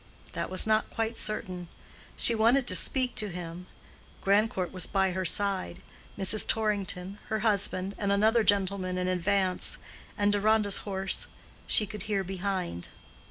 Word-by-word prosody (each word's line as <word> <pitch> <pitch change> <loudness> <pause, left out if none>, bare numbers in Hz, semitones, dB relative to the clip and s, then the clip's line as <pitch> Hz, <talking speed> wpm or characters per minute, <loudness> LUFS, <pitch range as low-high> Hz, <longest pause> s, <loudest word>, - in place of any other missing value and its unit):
That - - -3
was 185 - -1
not 215 0 +1
quite 225 0 -2
certain. 185 -5 -3 0.5
She 235 - +3
wanted 235 +4 +3
to 185 - +1
speak 255 +5 +2
to 210 - 0
him. 175 0 -7 0.5
Grandcourt 200 -2 +1
was 185 -2 +1
by 190 -1 +1
her 185 +1 -3
side; 190 0 +1 0.4
Mrs. 195 +2 +3
Torrington, 200 -3 -1
her 220 -1 -1
husband, 200 -3 +1
and 200 -1 0
another 220 +3 +3
gentleman 195 -2 +1
in 180 0 -1
advance; 185 +1 0 0.4
and 205 -1 +2
Deronda's 205 0 +2
horse 190 -1 -1 0.4
she 215 - +4
could 210 0 -7
hear 200 -2 0
behind. 185 - -4
200 Hz, 145 wpm, -28 LUFS, 185-215 Hz, 0.5 s, she